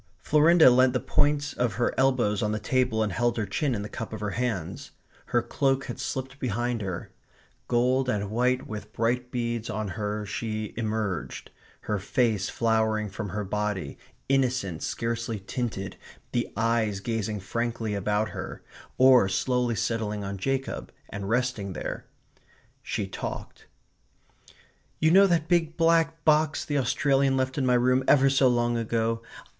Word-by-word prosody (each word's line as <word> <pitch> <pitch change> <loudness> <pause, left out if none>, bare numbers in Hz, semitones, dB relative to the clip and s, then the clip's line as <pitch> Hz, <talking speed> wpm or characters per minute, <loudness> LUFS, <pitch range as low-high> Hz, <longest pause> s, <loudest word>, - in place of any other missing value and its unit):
Florinda 155 -1 +6
leant 130 0 +4
the 125 - +1
points 145 +2 +1
of 120 -2 0
her 120 - 0
elbows 130 -6 +2
on 105 -2 0
the 110 - -1
table 125 -1 +1
and 105 -4 -2
held 120 +6 +1
her 110 - 0
chin 125 +6 -1
in 100 - -3
the - - -5
cup 110 +1 -6
of 110 - -5
her 105 -1 -3
hands. 115 -9 -3 0.4
Her - - +1
cloak 135 -1 0
had 120 - -6
slipped 135 +1 -4
behind 120 -1 -1
her. 95 -4 -5 0.6
Gold 125 +2 +2
and 105 -3 -1
white 125 +3 +1
with 105 -1 -7
bright 125 +2 0
beads 120 -2 -2
on 110 -1 -3
her 105 +1 -3
she 110 0 -4
emerged, 110 -5 -3 0.3
her 105 -1 -2
face 105 -1 0
flowering 110 -2 +1
from 100 +1 -5
her 105 +4 -3
body, 105 -1 -3 0.3
innocent, 125 -11 0
scarcely 115 -1 -2
tinted, 100 -2 -4 0.3
the 120 - -1
eyes 115 -3 +1
gazing 110 -1 -2
frankly 115 +2 -2
about 105 +2 0
her, - - -7 0.3
or 130 -6 +6
slowly 125 +4 0
settling 110 -2 -2
on 100 0 -4
Jacob 135 +6 -2 0.2
and 100 0 -5
resting 115 -5 -1
there. - - -5 0.7
She - - -3
talked: - - -7 1.3
"You 160 +1 +4
know 195 +2 +7
that 165 -4 +1
big 165 -2 +1
black 165 -1 +2
box 155 0 +3
the 145 -1 0
Australian 135 +1 +2
left 130 0 -1
in 135 -3 0
my 125 - +4
room 125 +2 +3
ever 135 -1 +5
so 135 -1 +4
long 120 -1 +2
ago? 115 0 -1
115 Hz, 155 wpm, -27 LUFS, 105-130 Hz, 1.3 s, know